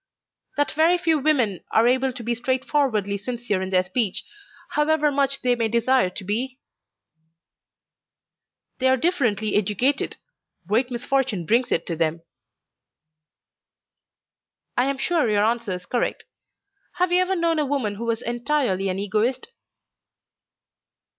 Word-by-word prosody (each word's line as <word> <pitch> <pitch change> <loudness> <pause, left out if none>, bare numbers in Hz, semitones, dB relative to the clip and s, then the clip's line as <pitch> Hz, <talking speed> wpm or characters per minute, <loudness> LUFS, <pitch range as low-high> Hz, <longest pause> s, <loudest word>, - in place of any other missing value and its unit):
"That 290 - +1
very 325 +3 +3
few 325 -3 +1
women 255 - +1
are 225 +2 +3
able 260 +1 +2
to 245 -1 -8
be 235 +1 0
straightforwardly 245 -4 0
sincere 235 -2 -3
in 190 - -3
their 185 -1 +3
speech, 215 -1 -1 0.5
however 300 0 +2
much 275 -1 0
they 250 -1 +3
may 230 -1 0
desire 235 -2 +2
to 185 +2 -8
be?" 245 +7 -2 2.2
"They 260 - +2
are 260 0 +4
differently 240 - 0
educated. 215 +8 0 0.5
Great 225 +7 +1
misfortune 245 -6 -1
brings 235 +7 +2
it - - +1
to 170 - -3
them." 165 0 -1 2.5
"I 250 - +2
am 275 0 -1
sure 300 -2 +1
your 210 0 +3
answer 230 -3 0
is 180 0 -6
correct. 245 - -2 0.7
Have 360 0 0
you 360 +1 +4
ever 375 +1 0
known 335 -2 +1
a 300 - +1
woman 260 -7 -1
who 225 +3 -6
was 230 -1 -2
entirely 240 -6 0
an 185 - -2
Egoist?" 215 - -1
245 Hz, 135 wpm, -23 LUFS, 210-280 Hz, 2.5 s, are